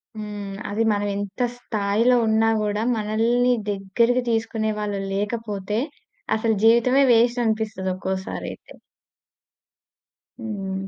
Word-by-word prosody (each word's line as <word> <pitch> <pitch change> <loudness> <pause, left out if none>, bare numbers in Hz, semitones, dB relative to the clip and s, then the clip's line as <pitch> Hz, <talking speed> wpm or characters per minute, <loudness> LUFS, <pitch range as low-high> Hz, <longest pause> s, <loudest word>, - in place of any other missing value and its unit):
హ్మ్. 205 -2 -6
అది 210 +3 0
మనం 205 0 0
ఎంత 200 +3 -5 0.2
స్థాయిలో 220 +1 +1
ఉన్నా 220 +1 +3
కూడా, 210 0 -1 0.2
మనల్ని 230 +4 +2 0.2
దగ్గరికి 230 +6 +1
తీసుకునే 225 -1 0
వాళ్ళు 205 -1 -2
లేకపోతే, 210 0 -2 0.6
అసలు 220 0 +1
జీవితమే 235 +4 +5
వేస్ట్ 235 +1 +3
అనిపిస్తది 215 -4 -1
ఒక్కోసారి 190 0 -4
అయితే. - - -17 1.7
హ్మ్. 200 -4 -4
215 Hz, 105 wpm, -23 LUFS, 205-230 Hz, 1.7 s, జీవితమే